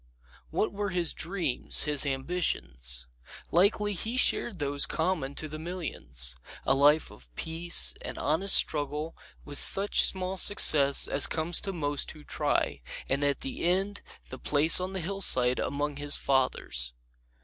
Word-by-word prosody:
What 215 - -2
were 205 0 -3
his 175 -3 0
dreams, 175 -8 +1
his 145 -1 +1
ambitions? 65 - -2 0.4
Likely 205 +3 +2
he 225 +7 -4
shared 235 -5 +1
those 145 -2 -1
common 160 -5 -2
to 155 - -3
the 155 +1 -8
millions: 110 - -3 0.3
a - - +3
life 145 +3 +3
of 60 -1 -16
peace 160 - +3
and - - -6
honest 175 +7 +2
struggle, 150 +1 +1 0.3
with 145 -1 -3
such 200 +1 +4
small 190 0 -1
success 145 -9 +4
as 140 - +3
comes 165 +1 -1
to 195 - -4
most 145 -5 -2
who 155 -1 -15
try; - - -1 0.3
and 140 +2 -1
at 140 -1 0
the 135 - -4
end 190 +4 -1 0.3
the 130 - -9
place 150 +4 +3
on 185 +1 -4
the 190 - -4
hillside 160 -9 0
among 145 +1 -3
his 145 0 +2
fathers. 65 - -1
155 Hz, 150 wpm, -28 LUFS, 140-185 Hz, 0.4 s, such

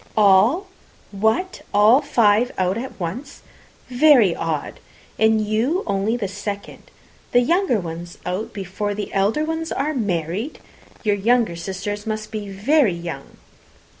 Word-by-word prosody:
"All! 215 - +5 0.5
What, 220 - 0
all 215 +7 +6
five 235 -4 +3
out 185 0 +1
at 245 +1 -6
once? 230 - -6 0.4
Very 250 - +5
odd! 160 -3 -3 0.4
And 220 0 +3
you 240 - 0
only 200 +3 0
the 210 -4 -2
second. 200 +1 -7 0.4
The 245 - +6
younger 335 - +2
ones 170 0 -7
out 185 +5 -3
before 200 +1 -4
the 210 - -5
elder 205 +10 +1 0.3
are 300 +3 0
married! 200 - -2 0.5
Your 210 -2 +2
younger 230 -2 +2
sisters 195 +4 -5
must 215 -1 -4
be 210 -2 -5
very 215 - +2
young?" 170 -5 -8
210 Hz, 130 wpm, -21 LUFS, 195-245 Hz, 0.5 s, all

